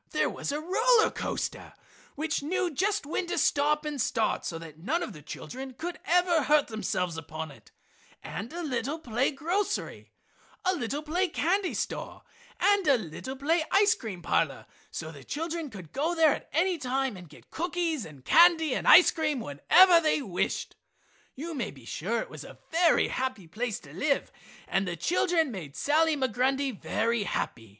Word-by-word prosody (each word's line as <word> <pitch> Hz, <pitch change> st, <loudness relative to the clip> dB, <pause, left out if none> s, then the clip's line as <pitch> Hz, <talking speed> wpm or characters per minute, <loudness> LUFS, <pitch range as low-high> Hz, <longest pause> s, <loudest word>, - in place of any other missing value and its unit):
There -, -, 0 dB
was -, -, -4 dB
a 295 Hz, -, -2 dB
roller 440 Hz, +8 st, +3 dB
coaster -, -, -4 dB, 0.4 s
which 310 Hz, +1 st, -1 dB
knew 345 Hz, +3 st, -1 dB
just 395 Hz, +4 st, 0 dB
when 340 Hz, +4 st, -2 dB
to 355 Hz, 0 st, -2 dB
stop 300 Hz, 0 st, +2 dB
and 295 Hz, -3 st, -2 dB
start 225 Hz, 0 st, 0 dB
so 165 Hz, -, -4 dB
that 160 Hz, -2 st, -11 dB
none 320 Hz, -, -1 dB
of 220 Hz, -, -6 dB
the 150 Hz, -, -11 dB
children 260 Hz, -, -8 dB
could 345 Hz, +6 st, -5 dB
ever 350 Hz, -1 st, +3 dB
hurt 295 Hz, +1 st, +3 dB
themselves 180 Hz, -6 st, -2 dB
upon 160 Hz, 0 st, -7 dB
it, 140 Hz, -, -17 dB, 0.5 s
and 215 Hz, +5 st, -6 dB
a 345 Hz, +1 st, -5 dB
little 270 Hz, +1 st, -2 dB
play 245 Hz, -4 st, 0 dB
grocery, 345 Hz, +8 st, -2 dB, 0.5 s
a 370 Hz, -, +3 dB
little 290 Hz, -2 st, -3 dB
play 350 Hz, +5 st, 0 dB
candy 360 Hz, +4 st, 0 dB
store, -, -, -4 dB, 0.4 s
and 405 Hz, -4 st, +3 dB
a 275 Hz, -3 st, +6 dB
little 220 Hz, -, -7 dB
play 315 Hz, +5 st, +1 dB
ice 410 Hz, +2 st, +5 dB
cream 210 Hz, -, -7 dB
parlor 160 Hz, -5 st, 0 dB, 0.2 s
so 160 Hz, -1 st, -6 dB
that 150 Hz, -, -12 dB
the -, -, -13 dB
children 325 Hz, +1 st, -4 dB
could 185 Hz, -9 st, -11 dB
go 320 Hz, +6 st, -1 dB
there 320 Hz, -3 st, +5 dB
at -, -, -8 dB
any 345 Hz, +3 st, +1 dB
time 265 Hz, -2 st, -1 dB
and 180 Hz, -3 st, -11 dB
get 150 Hz, -, -17 dB
cookies 335 Hz, -4 st, -1 dB
and 145 Hz, -6 st, -12 dB
candy 325 Hz, -3 st, +6 dB
and -, -, -2 dB
ice 360 Hz, -, +9 dB
cream 305 Hz, -5 st, -1 dB
whenever 335 Hz, -, +5 dB
they 310 Hz, -1 st, +2 dB
wished. 195 Hz, -10 st, -2 dB, 0.6 s
You 330 Hz, +5 st, -5 dB
may 245 Hz, -8 st, -3 dB
be 135 Hz, -4 st, -14 dB
sure 220 Hz, -, -2 dB
it -, -, -7 dB
was -, -, -8 dB
a -, -, -12 dB
very 335 Hz, 0 st, +4 dB
happy 255 Hz, -7 st, -3 dB
place 220 Hz, +6 st, -3 dB
to -, -, -14 dB
live 280 Hz, -1 st, 0 dB, 0.4 s
and 195 Hz, 0 st, 0 dB
the 175 Hz, -, -2 dB
children 330 Hz, -, +1 dB
made 160 Hz, -9 st, -8 dB
Sally 310 Hz, +1 st, +2 dB
Migrundy 265 Hz, +2 st, +1 dB
very 230 Hz, +1 st, -1 dB
happy. 115 Hz, -, -3 dB
285 Hz, 180 wpm, -28 LUFS, 215-335 Hz, 0.6 s, ice